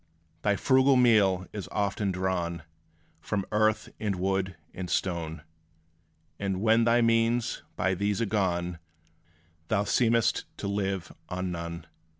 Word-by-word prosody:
Thy 100 +3 +2
frugal 130 +4 +4
meal 105 -7 +4
is 105 -3 -6
often 100 -1 0
drawn 90 -3 -2 0.6
From 100 +4 -2
earth, 110 0 +2
and 105 -3 -1
wood, 95 0 -1 0.2
and 90 -1 -5
stone; 80 -4 -2 1.0
And 95 -2 -1
when 115 +2 +4
thy 120 +1 +4
means 115 +1 +2
by 95 +1 +1
these 100 +2 0
are 115 - +1
gone, 90 -4 -1 0.9
Thou 100 +2 +1
seem'st 115 +1 +2
to - - -4
live 95 -3 -2 0.2
on 90 0 -3
none. 85 0 -5
100 Hz, 130 wpm, -28 LUFS, 90-110 Hz, 1.0 s, frugal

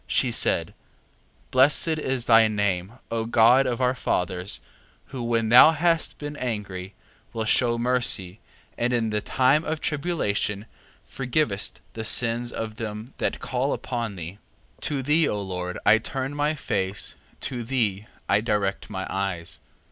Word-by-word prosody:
She - - +1
said: - - +2 0.8
Blessed 135 +5 +5
is 130 -4 -2
thy 115 -1 +6
name, 100 -2 -1 0.2
O 115 -1 -1
God 120 +4 +5
of 120 -2 -2
our 125 0 +2
fathers, 90 -5 -2 0.5
who 130 - -6
when 115 -1 0
thou 125 +7 +8
hast 165 0 +1
been 145 0 -6
angry, 100 -5 -5 0.4
wilt 110 -1 -2
shew 120 -2 +3
mercy, 115 -6 0 0.4
and 120 +1 +1
in 115 -2 0
the 105 0 -1
time 135 +8 +2
of 160 0 -3
tribulation 140 - -1 0.4
forgivest 125 -6 -1
the 110 - -5
sins 120 +2 +2
of 110 -1 -5
them 110 +2 -6
that - - -1
call 130 +2 -1
upon 115 -5 -4
thee. 90 +3 -8 0.4
3:14. - - -29
To 140 -3 -1
thee, 150 +3 +3
O 105 - -2
Lord, 90 -2 -4
I 110 +2 +6
turn 135 +4 -3
my 145 +1 0
face, 95 -8 -2 0.3
to 125 -3 -3
thee 110 -5 -1 0.2
I 100 +1 +3
direct 105 -3 -1
my 95 -3 -4
eyes. 95 -4 -4
115 Hz, 150 wpm, -25 LUFS, 105-130 Hz, 0.8 s, thou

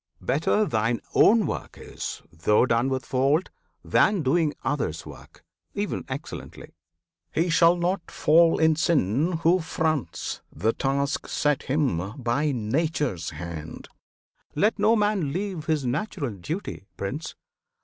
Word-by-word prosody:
Better 165 +8 +2
thine 115 - 0
own 220 -1 +5
work - - -5
is, - - -6
though 105 +9 +3
done 120 +1 +1
with 130 -2 -2
fault, 140 +8 +1 0.3
Than 200 -5 +3
doing 150 +2 +2
others' 130 - -2
work, - - -13 0.3
ev'n - - -2
excellently. - - -8 0.6
He 170 +2 +1
shall 170 +1 +5
not 175 +1 -1
fall 165 +2 +4
in 160 0 +4
sin 150 - +1
who 175 +3 +4
fronts 155 - -2
the 110 +8 0
task 140 +1 -1
Set 150 -1 +1
him 105 - 0
by 135 +5 0
Nature's 130 - -1
hand! 80 -2 -8 0.7
Let 210 +8 +2
no 215 +3 +4
man 205 -8 +1
leave 185 -4 -4
His 155 -4 0
natural 140 - -2
duty, 105 - -6
Prince! 140 +11 -4
150 Hz, 130 wpm, -25 LUFS, 120-170 Hz, 0.7 s, own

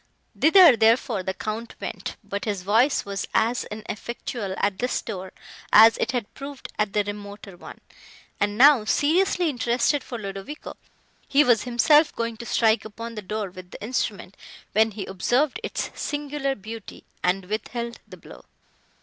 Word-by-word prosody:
Thither, 330 -4 +7
therefore, 225 -1 +2
the 190 +1 -4
Count 220 +3 -5
went, - - -5
but 200 0 -5
his 200 -4 -3
voice 230 +8 +2
was 200 -1 -4
as 235 +2 +1
ineffectual 215 -1 -6
at 200 -1 0
this 250 - 0
door 190 -4 -7 0.4
as 225 +1 +8
it - - 0
had 240 -4 -4
proved 275 0 -8
at 210 -2 0
the 210 - +2
remoter 205 -1 -8
one; - - -12 0.6
and 205 0 0
now, 275 -2 +7
seriously 340 - +2
interested 250 +1 +1
for 240 - -6
Ludovico, 200 +7 -7 0.5
he 290 +1 +5
was 240 -5 +3
himself 295 +6 +4
going 230 0 -2
to 235 - -8
strike 225 -1 +2
upon 230 +2 -8
the 215 - -6
door 205 0 -4
with 185 0 -12
the - - -10
instrument, 210 -5 -3 0.4
when 220 +2 +3
he 205 -2 -6
observed 245 +9 0
its - - -4
singular 290 -2 -3
beauty, 220 0 -10 0.2
and 180 +1 +1
withheld 235 +4 -4
the - - -12
blow. - - -14
225 Hz, 160 wpm, -24 LUFS, 205-255 Hz, 0.6 s, as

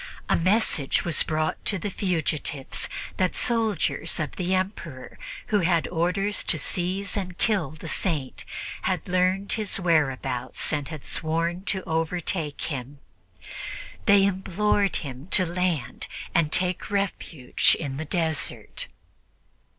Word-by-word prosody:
A - - +5
message 185 -5 +3
was 170 -3 +4
brought 155 0 0
to 205 - +2
the 195 +3 -3
fugitives 155 -7 -1 0.3
that 185 -1 +1
soldiers 220 -9 +1
of 155 - -2
the 185 0 +1
Emperor 175 -8 -4 0.3
who 210 - +3
had 170 -2 +2
orders 180 +4 +1
to 160 - +3
seize 185 +6 -1
and 185 -3 -3
kill 195 - +1
the 155 +1 -9
Saint 155 -6 -1 0.4
had - - -1
learned 185 +2 +2
his 215 -3 0
whereabouts 135 -8 +1
and 145 -2 -1
had 155 -4 -7
sworn 165 +3 0
to 190 -2 0
overtake 160 -1 -1
him. 140 -1 -4 1.1
They 200 -1 +7
implored 200 +1 +1
him 135 0 -5
to 185 - +4
land 175 -7 -1 0.3
and 155 -3 +3
take 180 +3 +1
refuge 195 - +2
in 140 -4 -3
the 160 - -3
desert. 160 -1 -1
175 Hz, 125 wpm, -26 LUFS, 155-190 Hz, 1.1 s, They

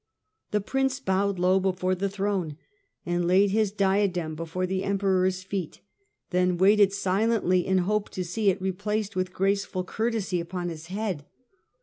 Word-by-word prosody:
The 210 - 0
prince 265 +5 0
bowed 195 -3 0
low 185 +2 +3
before 185 -1 0
the 195 +2 -1
throne, 195 -6 -2 0.5
and 175 0 0
laid 190 +2 +4
his 215 -1 +2
diadem 190 -5 +1
before 165 +3 -3
the 190 +1 -2
Emperor's 190 -2 +1
feet, 190 -3 -5 0.5
then 180 -1 +2
waited 200 +2 +5
silently 195 -1 +1
in 190 0 +3
hope 210 +1 0
to 185 - -1
see 200 +4 +1
it 195 +1 0
replaced 205 +2 -2
with 185 0 -1
graceful 195 -1 0
courtesy 215 -2 -1
upon 175 +1 -4
his 160 -1 -8
head. 190 -6 -3
190 Hz, 150 wpm, -26 LUFS, 180-200 Hz, 0.5 s, waited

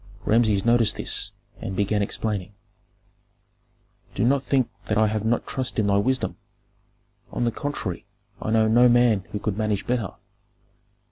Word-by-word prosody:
Rameses 110 -3 +3
noticed 115 -2 +4
this, - - -1 0.3
and 95 - -5
began 105 +1 +1
explaining, 100 -1 -2 1.6
"Do 100 - 0
not 135 +3 +3
think 135 -3 +1 0.2
that 105 - -1
I 110 - +5
have 110 -1 -1
not 115 +2 0
trust 130 -2 -3
in 110 - +2
thy 100 0 +3
wisdom. 130 +6 0 0.9
On - - -2
the 120 - +1
contrary, 125 -9 -4 0.3
I - - -3
know 110 0 +3
no 120 +3 +5
man 120 -5 +3
who - - -2
could 105 0 -3
manage 105 -2 -1
better. 120 -5 -2
110 Hz, 150 wpm, -24 LUFS, 105-120 Hz, 1.6 s, I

